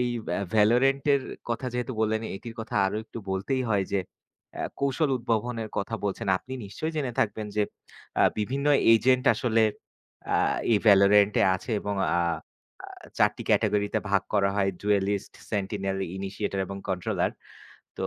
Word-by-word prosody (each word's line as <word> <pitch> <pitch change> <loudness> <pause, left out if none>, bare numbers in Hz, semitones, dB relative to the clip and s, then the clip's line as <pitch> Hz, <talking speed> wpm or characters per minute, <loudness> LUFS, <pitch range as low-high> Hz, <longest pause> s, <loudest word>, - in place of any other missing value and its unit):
এই 125 - +1 0.2
ভা 85 - 0 0.2
'ভ্যালরেন্টের' 135 +6 +3 0.3
কথা 115 +2 -2
যেহেতু 125 +1 -2
বললেন 110 0 +1 0.2
এটির 115 +3 -9
কথা 110 - -7
আরো 95 - -2
একটু 115 - -9
বলতেই 115 +8 -1
হয়। 100 -3 +2
যে 100 - +2 0.6
আ - - -1 0.2
কৌশল 140 +2 +1
উদ্ভাবনের 115 -1 -2
কথা 105 +3 -2
বলছেন। 100 +2 -2
আপনি 130 - -11
নিশ্চয়ই 155 +12 -4
জেনে 135 -5 -1
থাকবেন 105 0 -1
যে 105 - +3 0.6
আ - - +6 0.2
বিভিন্ন 135 +7 -1 0.3
এজেন্ট 125 +2 +3
আসলে 115 0 +2 0.7
আ - - +4 0.4
এই 105 - +5
'ভ্যালরেন্টে' 100 0 +5
আছে 105 - -9
এবং 100 0 -2 0.2
আ - - +3 1.0
৪ - - +5
টি - - -6
ক্যাটাগরিতে 105 0 +2
ভাগ 100 -1 +3
করা 100 -1 +3
হয়। 95 -1 +2
জুয়েলিস্ট, 100 -1 0 0.2
সেন্টিনেল, 95 -1 -2 0.2
ইনিশিয়েটর, 100 0 -3
এবং 100 +1 -6
কন্ট্রোলার। 90 -2 -1 0.7
তো - - -1
105 Hz, 150 wpm, -27 LUFS, 100-125 Hz, 1.0 s, আ